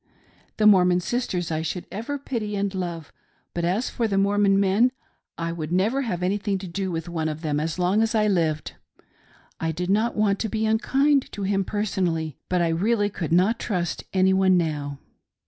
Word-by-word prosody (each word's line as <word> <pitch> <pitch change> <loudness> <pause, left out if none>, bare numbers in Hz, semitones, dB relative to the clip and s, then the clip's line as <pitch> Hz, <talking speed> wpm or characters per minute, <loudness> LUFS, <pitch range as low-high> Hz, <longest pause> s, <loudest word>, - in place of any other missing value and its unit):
The 215 - +2
Mormon 180 -3 +6
sisters 180 -4 -2
I 155 0 -1
should 165 +3 -4
ever 230 +8 -4
pity 230 -7 -4
and 200 0 -1
love; 170 -4 -5 0.4
but 170 - -2
as 190 +8 0
for 230 - 0
the 195 -2 -1
Mormon 200 0 +3
men, 200 +6 +3 0.5
I 165 0 -2
would 165 -2 -5
never 210 +10 +2
have 180 -9 -3
anything 200 +2 0
to 190 0 -7
do 190 +2 -3
with 165 -1 -4
one 160 -2 -2
of 155 0 -5
them 150 -3 -1
asi 160 +2 -3
long 185 +4 +2
as 225 +1 +1
I 215 -1 +3
lived. 160 -6 0 0.9
I 165 0 -1
did 180 +3 -2
not 220 +4 +1
want, 205 -2 +2
to 220 - -2
be 220 0 -1
unkind 270 +6 +2
to 205 - -4
him 195 0 +1
personally, 180 -7 -2
but 180 -1 +2
I 165 -1 +1
reallji 205 +3 +1
could 165 -4 -4
not 190 +7 +3
trust 180 -6 -2
any 190 0 +3
one 190 -1 +4
now. 145 -4 -2
190 Hz, 195 wpm, -24 LUFS, 170-210 Hz, 0.9 s, Mormon